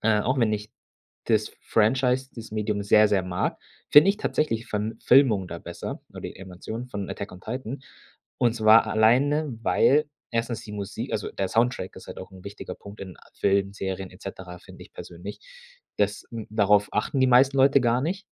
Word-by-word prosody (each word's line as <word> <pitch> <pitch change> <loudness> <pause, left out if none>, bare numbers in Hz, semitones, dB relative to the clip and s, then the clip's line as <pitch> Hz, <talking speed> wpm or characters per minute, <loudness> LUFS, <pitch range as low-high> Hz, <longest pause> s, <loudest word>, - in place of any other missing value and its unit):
äh, 110 -1 +3
auch 130 +5 0
wenn 115 -3 +2
ich 105 0 -4 0.5
das 110 -2 +1
Franchise, 125 +4 +1
das 115 -1 -9
Medium 105 -1 -2
sehr, 105 +1 +5
sehr 100 -3 +2
mag, 90 -1 -2 0.3
finde 150 +6 +8
ich 200 - +3
tatsächlich 115 - -1
von 110 +2 -3
Filmungen 120 -8 +4
da 85 - -6
besser 85 0 -7
oder - - -10
die - - -7
Animation 100 +6 -7
von 100 -5 -5
„Attack 100 - -6
on 90 - -12
Titan“. 125 +4 -5 0.6
Und 120 -1 +2
zwar 110 0 +6
alleine, 135 +7 +2
weil 150 +5 +3 0.2
1. 115 -1 -2
die 105 -3 -10
Musik 100 -2 -5
also - - -2
der 95 -1 -2
Soundtrack 115 -4 0
ist - - -11
halt - - -9
auch 95 +1 -9
'n 95 -1 -14
wichtiger 100 +1 -7
Punkt 100 +1 -13
in 95 -3 -8
a - - -22
Filmen, 100 0 +1
Serien 95 -1 -4
et 90 - -17
cetera, 90 -2 -8
finde - - -14
ich - - -17
persönlich. 90 +4 -9 0.6
Das 105 0 0
n 115 -2 -6
darauf 105 -1 +3
achten 130 +5 -1
die 130 - +5
meisten 130 +2 +5
Leute 135 +1 +5
gar 120 0 +2
nicht 185 +8 -3
110 Hz, 190 wpm, -25 LUFS, 100-125 Hz, 0.6 s, finde